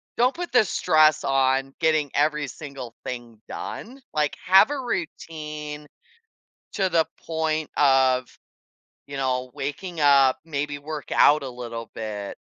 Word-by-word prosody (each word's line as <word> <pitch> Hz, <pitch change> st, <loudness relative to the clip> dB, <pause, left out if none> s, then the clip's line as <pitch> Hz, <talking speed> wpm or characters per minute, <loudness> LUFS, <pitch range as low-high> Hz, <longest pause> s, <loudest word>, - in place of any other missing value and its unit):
don't 250 Hz, +3 st, +2 dB
put 350 Hz, 0 st, -5 dB
the 245 Hz, -3 st, +5 dB
stress 155 Hz, -4 st, +3 dB
on 135 Hz, 0 st, +1 dB
getting 155 Hz, -4 st, +2 dB
every 150 Hz, 0 st, +1 dB
single 140 Hz, -5 st, -8 dB
thing 120 Hz, -3 st, -7 dB
done, 255 Hz, +5 st, -7 dB
like, 150 Hz, -1 st, 0 dB
have 190 Hz, +6 st, +7 dB
a 290 Hz, -1 st, -2 dB
routine 155 Hz, -, -5 dB, 0.9 s
to 195 Hz, -3 st, +1 dB
the 165 Hz, -2 st, +3 dB, 0.2 s
point 160 Hz, -1 st, -1 dB
of, 130 Hz, -3 st, +4 dB, 0.8 s
you 140 Hz, -, -6 dB
know, 130 Hz, -1 st, -1 dB
waking 165 Hz, +6 st, -5 dB
up, 140 Hz, -3 st, +5 dB
maybe 145 Hz, -2 st, -3 dB
work 150 Hz, 0 st, -7 dB
out 150 Hz, 0 st, +5 dB
a 135 Hz, -, -4 dB
little 115 Hz, -2 st, -7 dB
bit, 105 Hz, -2 st, -6 dB
145 Hz, 135 wpm, -24 LUFS, 130-160 Hz, 0.9 s, have